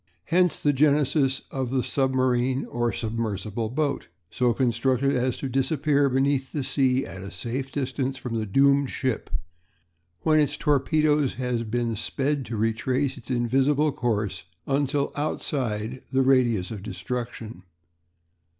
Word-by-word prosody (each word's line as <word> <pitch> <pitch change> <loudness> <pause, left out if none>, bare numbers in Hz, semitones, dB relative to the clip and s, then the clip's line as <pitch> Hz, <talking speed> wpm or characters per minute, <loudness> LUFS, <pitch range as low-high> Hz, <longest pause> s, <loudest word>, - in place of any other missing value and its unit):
Hence 175 0 +2
the 145 - +4
genesis 140 -1 +2
of 130 -2 -2
the 130 -1 0
submarine 130 -1 +1
or 120 -1 -1
submersible 110 0 -3
boat, 140 +3 -1 0.2
so 125 -1 +2
constructed 130 +2 +1
as 125 0 0
to 135 - -3
disappear 140 +2 +2
beneath 135 0 +1
the 145 - -1
sea 130 0 +1
at 95 +2 -8
a 100 - -7
safe 120 +8 -4
distance 135 -1 -2
from 125 -2 -5
the 110 - -3
doomed 140 +5 +4
ship, 130 -5 -2
and - - -2 0.8
when 155 -1 +4
its 145 -1 +1
torpedo 150 +1 +2
has 125 -1 -2
been 115 0 -1
sped 135 +4 -1
to 115 0 -4
retrace 125 +5 0
its 130 -3 -12
invisible 135 +5 +2
course 105 -8 -2 0.2
until 140 +1 0
outside 130 -5 -2
the 135 0 +3
radius 120 -8 +3
of 105 -3 -6
destruction. 115 -1 -5
130 Hz, 140 wpm, -25 LUFS, 120-140 Hz, 0.8 s, the